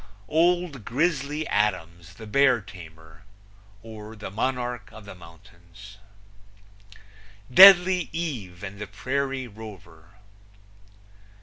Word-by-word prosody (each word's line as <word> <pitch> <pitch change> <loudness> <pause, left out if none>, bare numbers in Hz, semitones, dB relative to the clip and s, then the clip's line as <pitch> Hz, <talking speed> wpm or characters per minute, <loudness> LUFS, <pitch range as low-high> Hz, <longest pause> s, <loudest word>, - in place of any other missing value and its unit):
Old 170 -5 0
Grizzly 150 - -2
Adams, 85 -5 -2
the 110 +1 -11
Bear 130 +3 +3
Tamer; 80 -5 -15 0.6
or, 110 -1 -11
The 105 -2 -9
Monarch 120 -1 -3
of 110 -1 -14
the 100 - -10
Mountains. 90 +3 -17 1.5
Deadly 185 0 +7
Eye 115 - -6
and 100 0 -10
the 105 - -6
Prairie 130 +5 -4
Rover. 100 -6 -14
110 Hz, 95 wpm, -24 LUFS, 95-140 Hz, 1.5 s, Deadly